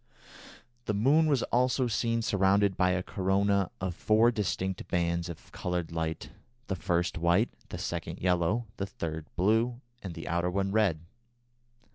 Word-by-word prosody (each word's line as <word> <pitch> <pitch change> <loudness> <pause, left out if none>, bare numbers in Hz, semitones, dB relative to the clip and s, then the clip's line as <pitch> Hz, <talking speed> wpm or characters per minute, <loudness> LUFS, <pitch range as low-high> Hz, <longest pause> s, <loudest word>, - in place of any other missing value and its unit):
The 105 - -1
moon 145 +10 +4
was 140 -5 +2
also 125 +1 +3
seen 115 0 0
surrounded 100 -1 +3
by 90 - +3
a 90 0 0
corona 100 -1 +1
of 95 -1 -2
four 110 +6 +3
distinct 95 -4 -2
bands 85 0 0
of 85 - -10
coloured 90 -2 -3
light, 80 -1 -3 0.3
the 95 - -2
first 90 -1 -1
white, 85 +7 +3 0.2
the - - -5
second - - -4
yellow, 90 +5 +1
the 100 - -2
third 80 -4 -5
blue, 115 +6 +2 0.2
and 90 -4 -6
the 80 - -7
outer 85 +2 0
one 95 +1 -1
red. 100 -7 +2
95 Hz, 150 wpm, -29 LUFS, 85-110 Hz, 0.3 s, moon